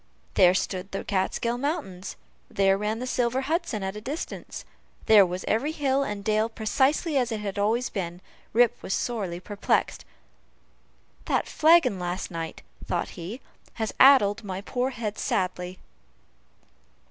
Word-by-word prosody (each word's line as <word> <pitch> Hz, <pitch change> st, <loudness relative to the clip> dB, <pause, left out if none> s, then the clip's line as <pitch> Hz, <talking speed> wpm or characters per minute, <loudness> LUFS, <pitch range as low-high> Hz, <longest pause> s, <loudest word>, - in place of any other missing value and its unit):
There 180 Hz, -1 st, +5 dB
stood 190 Hz, 0 st, -2 dB
the 195 Hz, -, -4 dB
Kaatskill 225 Hz, +5 st, -1 dB
mountains 275 Hz, -, -3 dB, 0.3 s
there 195 Hz, -1 st, +3 dB
ran 210 Hz, +2 st, -2 dB
the 250 Hz, -, -4 dB
silver 250 Hz, 0 st, 0 dB
Hudson 285 Hz, -, -1 dB
at 190 Hz, +1 st, -3 dB
a 210 Hz, -, -7 dB
distance 285 Hz, +9 st, -6 dB, 0.4 s
there 215 Hz, -2 st, +8 dB
was 180 Hz, +1 st, -5 dB
every 260 Hz, +8 st, +1 dB
hill 275 Hz, -3 st, +1 dB
and 205 Hz, -6 st, -3 dB
dale 215 Hz, +1 st, +2 dB
precisely 270 Hz, +8 st, +1 dB
as 245 Hz, -3 st, +1 dB
it 220 Hz, -, -2 dB
had 200 Hz, -1 st, -4 dB
always 225 Hz, +5 st, +1 dB
been 175 Hz, -3 st, -4 dB, 0.3 s
Rip 240 Hz, 0 st, +3 dB
was 195 Hz, -, -2 dB
sorely 200 Hz, -8 st, -3 dB
perplexed 205 Hz, +2 st, -1 dB, 1.2 s
"That -, -, 0 dB
flagon 310 Hz, -, +4 dB
last 180 Hz, +1 st, -3 dB
night," 165 Hz, -1 st, -6 dB, 0.2 s
thought 175 Hz, -, -1 dB
he, 190 Hz, +10 st, -7 dB, 0.3 s
"has 220 Hz, -2 st, -3 dB
addled 225 Hz, -6 st, +6 dB
my 190 Hz, -1 st, -5 dB
poor 250 Hz, +5 st, -1 dB
head 225 Hz, -5 st, -5 dB
sadly!" 180 Hz, -1 st, -2 dB
215 Hz, 145 wpm, -26 LUFS, 190-255 Hz, 1.2 s, there